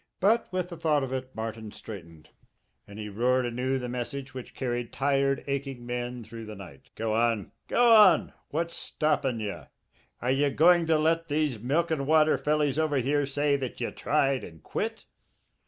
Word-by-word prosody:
But 220 +5 +3
with 185 -1 -2
the 170 - -8
thought 155 -3 +2
of 130 0 -4
it 130 0 -5
Martin 110 -1 -5
straightened, 85 -9 -11 0.6
and 100 - -11
he 105 -1 -5
roared 125 +5 +1
anew 125 +2 -1
the 125 -1 -4
message 130 +3 -5
which 130 -2 -9
carried 120 -2 -3
tired, 135 0 +1
aching 135 -3 -4
men 120 0 -4
through 115 0 -9
the 110 - -7
night: 90 -9 -12
"Go 110 -1 -1
on! 115 -2 +1 0.2
Go 240 -1 +4
on! 205 -7 +6 0.2
What's 165 +3 -2
stoppin' 145 -6 0
ye? 105 -2 -4 0.6
Are 125 - 0
ye 140 +2 +2
going 170 +3 +4
to 160 -1 +4
let 165 +2 +1
these 145 -5 0
milk 155 +9 0
an' 140 -4 -1
water 155 0 +5
fellys 150 -1 +1
over 155 -3 +1
here 140 +2 +1
say 145 +1 +1
that 130 -3 -5
ye 120 - -2
tried 140 -3 +1
and 80 -1 -11
quit?" - - -4
135 Hz, 180 wpm, -28 LUFS, 120-155 Hz, 0.6 s, on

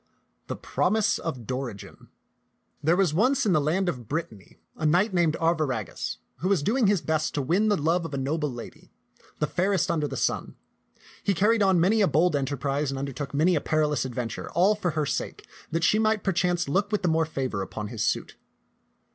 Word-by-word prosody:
THE - - -3
PROMISE 210 +1 +1
OF 130 -8 -5
DORIGEN 125 -5 -6 0.7
THERE 160 +3 +3
was 185 -5 +2
once 255 - +2
in 200 - +3
the 155 - +3
land 175 +6 0
of 125 -10 -3
Brittany 115 - -5 0.2
a - - -8
knight 180 +7 +3
named 170 -3 +2
Arviragus, 155 - -1 0.2
who 165 +8 -2
was 190 -7 +2
doing 225 - +2
his 195 -4 +2
best 155 -1 -1
to 145 - +1
win 190 +10 +2
the 205 - +3
love 165 +4 +1
of 165 - -6
a - - -2
noble 150 +2 -1
lady, 120 -1 -10 0.5
the - - +1
fairest 185 +5 +1
under 155 -3 0
the 135 -1 -5
sun. - - -1 0.7
He 200 - +1
carried 215 +5 +3
on 190 -3 +4
many 205 +6 +3
a 200 - +5
bold 160 +2 +2
enterprise 140 +1 -1
and 135 - -3
undertook 140 0 -4
many 165 +5 +3
a 150 - 0
perilous 150 -5 +1
adventure 125 -2 -4
all 185 +6 +4
for 205 -4 -2
her 155 - +2
sake, - - -4 0.2
that 165 +1 -1
she 215 - +4
might 220 -1 +1
perchance 175 -2 +1
look 195 +8 0
with 210 - 0
the - - +2
more 160 -1 +2
favor 130 -9 -3
upon 105 +2 -5
his 110 -2 -3
suit. - - -1
160 Hz, 195 wpm, -26 LUFS, 140-190 Hz, 0.7 s, a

